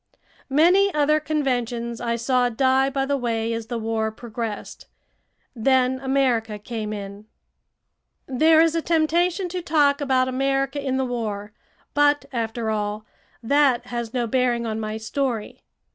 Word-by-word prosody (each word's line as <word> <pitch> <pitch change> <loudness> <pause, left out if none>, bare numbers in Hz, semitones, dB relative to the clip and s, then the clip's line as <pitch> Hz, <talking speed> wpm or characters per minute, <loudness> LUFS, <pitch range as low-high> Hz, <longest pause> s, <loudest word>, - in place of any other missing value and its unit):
Many 355 +8 +4
other 300 +1 +3
conventions 245 -6 -2
I 235 -1 -1
saw 245 +1 +1
die 265 +3 +2
by 270 0 -1
the 280 0 0
way 230 -2 -1
as 230 -1 -4
the 240 0 -3
war 220 -1 -1
progressed. 225 -1 -6 0.7
Then 260 +2 +2
America 255 -5 0
came 215 0 -5
in. 200 0 -7 1.0
There 315 +5 +4
is 330 -1 +3
a 330 - 0
temptation 340 +3 +1
to 360 +1 -4
talk 295 -3 +2
about 260 -2 +2
America 270 +2 -1
in 265 -1 -1
the 265 - 0
war, 215 -4 -4 0.4
but, 290 0 +3
after 225 -1 -2
all, 210 0 -3 0.4
that 260 -1 +3
has 235 -2 -3
no 245 -1 -1
bearing 240 0 +1
on 220 -1 -3
my 215 0 -3
story. 230 0 -3
250 Hz, 145 wpm, -23 LUFS, 225-280 Hz, 1.0 s, Many